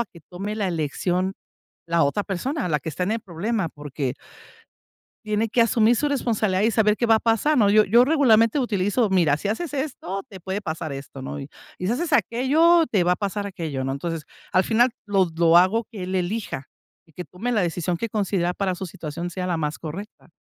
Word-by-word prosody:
a 235 - -1
que 170 - -16
tome 195 +4 -4
la 200 -3 0
elección 180 +4 -1 0.5
la 165 -2 +3
otra 170 +9 0
persona, 250 - -2
la 150 -2 +1
que 160 - -4
está 180 +5 -3
en 200 - -1
el 225 - -3
problema, 190 +1 -2
porque 145 -3 -4 1.1
tiene 215 +1 0
que 235 - 0
asumir 230 0 +4
su 295 - 0
responsabilidad 220 -8 0
y 220 - +3
saber 215 -1 +3
qué 235 - 0
va 225 - +6
a - - +2
pasar, 230 +8 +2
¿no?, 210 -4 +5
yo 215 0 +6
yo 235 +6 +5
regularmente 260 -4 +4
utilizo: 205 -1 +1
"Mira, 165 -6 +3
si 200 - -4
haces 295 +8 -3
esto, 250 - -3
te 190 -2 -10
puede 190 +4 -4
pasar 160 -4 -4
esto, 135 -1 -8
¿no?, 145 - -5
y 140 +1 -8 0.3
si 180 - -2
haces 310 +7 -1
aquello, 310 +7 +4
te 195 -5 +3
va 180 - +3
a - - -3
pasar 200 0 -3
aquello", 160 -8 -4
¿no?, 135 - -2
entonces, 160 +3 -4 0.3
al 185 - +4
final 240 +3 +3 0.2
lo 195 -3 +3
lo 170 0 +5
hago 200 +6 +3
que 205 -6 -7
él 185 - -4
elija, 185 -5 -2 0.4
y 160 - -24
que 180 - -7
tome 235 +7 -4
la 215 -4 +2
decisión 175 0 -1
que 230 - -2
considera 195 -5 -1
para 190 -1 -1
su 190 - -5
situación 170 0 -6
sea 185 +1 -4
la 175 - 0
más 150 -1 -3
correcta. 185 +7 -8
195 Hz, 215 wpm, -23 LUFS, 170-225 Hz, 1.1 s, va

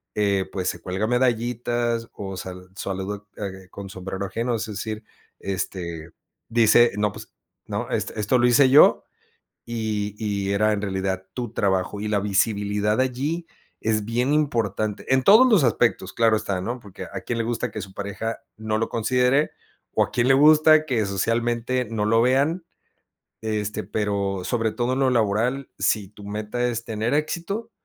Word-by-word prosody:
eh, 100 -2 +1
pues 95 -1 -1
se - - -5
cuelga 95 +4 -2
medallitas 120 -1 0
o 95 -2 -6
sa 90 0 -6
sa 90 0 -12
saluda, 100 +1 -4
eh, 95 -2 -6
con 100 -1 -8
sombrero 95 +1 -5
ajeno, 115 +4 -2
es 110 - -2
decir, 110 +1 -5 0.4
este, 85 -4 -4 0.4
dice, 115 +1 +5
¿no?, 105 0 +1
pues, 105 +1 -12 0.3
¿no?, - - -4
esto 110 +4 0
lo 120 0 +4
hice 130 +2 +5
yo 145 +3 +7 0.6
y 110 -3 -2
y 100 -3 -2
era 105 +2 +3
en 100 - -1
realidad 95 -1 -2
tu 120 -3 -4
trabajo 95 -1 0
y 105 - -3
la 105 -1 +1
visibilidad 105 +1 +1
allí 140 +7 -1 0.3
es 110 -1 0
bien 120 +5 0
importante, 110 -8 0
en 130 - +3
todos 220 - +7
los 195 - +4
aspectos, 115 -5 +1
claro 115 -1 +3
está 100 -3 -2
¿no?, 120 +6 -4
porque 95 -3 -9
a - - -4
quién 120 -1 -3
le 115 - 0
gusta 120 0 -2
que 105 - -6
su 95 0 -8
pareja 100 +3 -4 0.2
no 110 0 -2
lo 115 - -1
considere, 125 +5 +2 0.4
o - - +4
a - - -8
quién 120 +1 +2
le 135 - +6
gusta 155 +2 +6
que 115 -6 +1
socialmente 120 +5 0
no 105 -2 -1
lo 115 +2 +3
vean, 140 +8 +2 0.8
este, 110 -1 -2
pero 100 -3 -1
sobre 115 -3 0
todo 120 +3 -1
en - - -2
lo 130 -1 +3
laboral, 120 +4 0
si 105 -4 +1
tu 105 0 -14
meta 105 +4 -2
es 115 -1 -3
tener 110 +4 -1
éxito, 180 +9 -2
110 Hz, 170 wpm, -24 LUFS, 100-125 Hz, 0.8 s, yo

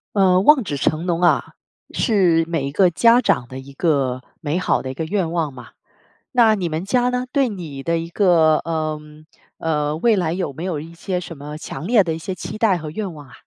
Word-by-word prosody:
呃， 185 -2 +4
望 270 +6 +5
子 145 -8 -4
成 155 +4 -1
龙 175 -1 -1
啊， 175 - +2 0.4
是 180 -7 +2
每 165 -5 -2
一 - - -5
个 185 +5 +4
家 230 +7 +5
长 125 - 0
的 130 +1 -7
一 140 +1 -12
个 135 -5 0 0.2
美 150 +2 -2
好 185 - +1
的 130 - -6
一 - - -4
个 150 - -4
愿 175 +1 -1
望 165 -4 -1
嘛。 125 -3 -12 0.6
那 230 -3 +5
你 185 -5 -2
们 160 +3 -3
家 245 +4 +2
呢？ 250 0 -2
对 275 -3 +2
你 165 -9 -7
的 165 +4 0
一 165 0 -4
个 170 -5 +4
呃 155 -2 -3 0.6
呃， 150 -2 -1
未 225 +6 +3
来 175 -4 0
有 180 -6 -3
没 160 - -7
有 180 -5 -2
一 165 +3 -10
些 180 +2 -3
什 170 -2 -8
么 150 +2 -8
强 160 +1 -7
烈 225 -3 +5
的 165 -3 -2
一 160 - -5
些 185 +3 -5
期 215 - -7
待 205 -6 +3
和 155 -2 -7
愿 195 +2 -4
望 145 -3 -12
啊？ 125 - -17
165 Hz, 245 characters per minute, -20 LUFS, 150-195 Hz, 0.6 s, 望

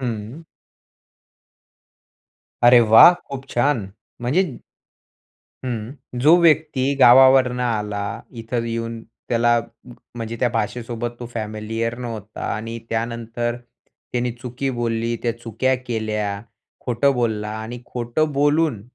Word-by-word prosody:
हं. 120 +4 -5 2.2
अरे 120 0 +8
वाह! 115 +9 +8 0.2
खूप 135 -1 -6
छान. 120 -5 +1 0.3
म्हणजे 140 +4 0 1.1
हं. 115 -3 -4 0.3
जो 155 +6 +7
व्यक्ती 155 -4 +2
गावावरून 130 0 +6
आला. 105 -4 -2
इथं 115 0 -3
येऊन 115 0 -4 0.3
त्याला 120 0 +3 0.6
म्हणजे 115 -1 -5
त्या 125 - +3
भाषेसोबत 120 0 -3
तो 120 - -5
फॅमिलियर 110 +1 -3
नव्हता 110 -4 -7
आणि 115 +2 -5
त्यानंतर 115 +1 -2 0.6
त्याने 125 0 0
चुकी 125 +3 -4
बोलली, 115 -1 -1
त्या 120 - 0
चुका 120 +3 0
केल्या 105 -3 -2 0.4
खोटं 125 +3 +1
बोलला 110 -4 -1
आणि 120 +2 -7
खोटं 125 +6 -1
बोलून 145 -4 +1
120 Hz, 105 wpm, -21 LUFS, 115-130 Hz, 2.2 s, अरे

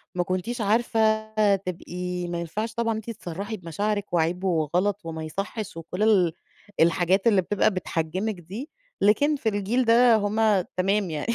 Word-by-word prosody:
ما 180 - +1
كنتيش 185 +7 -3
عارفة 220 0 +2 0.3
تبقي 180 -1 -5
ما 175 0 -3
ينفعش 215 +7 -4
طبعًا 230 -1 0
أنتِ 220 +1 -6
تصرَّحي 200 +1 -5
بمشاعرِك 200 +4 -3
وعيب 175 +3 +1
وغلط 180 +4 0
وما 160 -1 -5
يصحِّش، 200 +4 -5
وكُلّ 180 +5 -4
ال 185 -7 +4 0.5
الحاجات 175 +5 +3
اللي 205 -4 +5
بتبقى 200 +4 +1
بتحجِمِك 185 +3 -2
دي، 200 - -8 0.3
لكن 285 +9 +4
في 225 -5 -1
الجيل 215 +5 0
ده 235 0 +6
هُم 210 -1 +2 0.2
تمام 195 0 +1
يعني 155 +9 -2
200 Hz, 150 wpm, -25 LUFS, 175-220 Hz, 0.5 s, ده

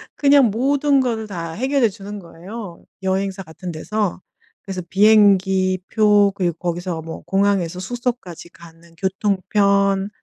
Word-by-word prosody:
그냥 280 -2 +5
모든 275 +5 +2
거를 225 -4 -1
다 170 -4 -5
해결해 260 - +1
주는 205 0 -8
거예요 180 +2 -10 0.2
여행사 190 0 -1
같은 175 +2 -8
데서. 190 +3 -3 0.4
그래서 190 -2 -5
비행기 190 -3 +4
표 205 -2 +4
그리고 175 -4 -1
거기서 175 -1 -3
뭐 160 0 -8
공항에서 195 -3 0
숙소까지 235 -6 -5
가는 170 0 -17
교통편 200 +1 +1
195 Hz, 290 characters per minute, -20 LUFS, 180-215 Hz, 0.4 s, 그냥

